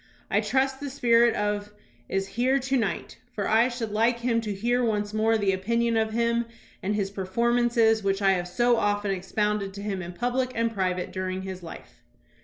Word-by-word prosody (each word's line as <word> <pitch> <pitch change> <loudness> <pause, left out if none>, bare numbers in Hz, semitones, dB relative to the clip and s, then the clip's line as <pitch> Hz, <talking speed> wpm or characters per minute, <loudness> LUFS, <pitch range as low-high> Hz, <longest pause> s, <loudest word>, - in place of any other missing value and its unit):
I - - +3
trust 265 0 0
the 285 - -5
spirit 235 -3 +3
of 205 0 -2 0.4
is 195 0 -1
here 255 +5 +2
to 270 0 -1
night, 205 -9 -2
for 205 - -2
I 225 +2 +4
should 240 -3 -4
hke 230 +3 +2
him 235 -1 0
to 215 -2 -4
hear 240 +5 0
once 210 -2 -1
more 220 +1 +2
the 200 -2 +1
opinion 230 +5 0
of 220 -1 +1
him 235 0 +1 0.4
and 205 +2 -1
his 200 -2 -1
performances 230 +3 +2
which 195 0 +1
I 195 -1 +4
have 180 -2 0
so 240 +6 +2
often 205 -1 0
expounded 200 +1 -1
to 200 - -7
him 200 -3 -3
in 175 0 -7
public 250 +4 -1
and 230 0 0
private 185 -3 -1
during 185 0 -3
his 190 -1 -6
life." 165 - -11
220 Hz, 195 wpm, -26 LUFS, 195-235 Hz, 0.4 s, I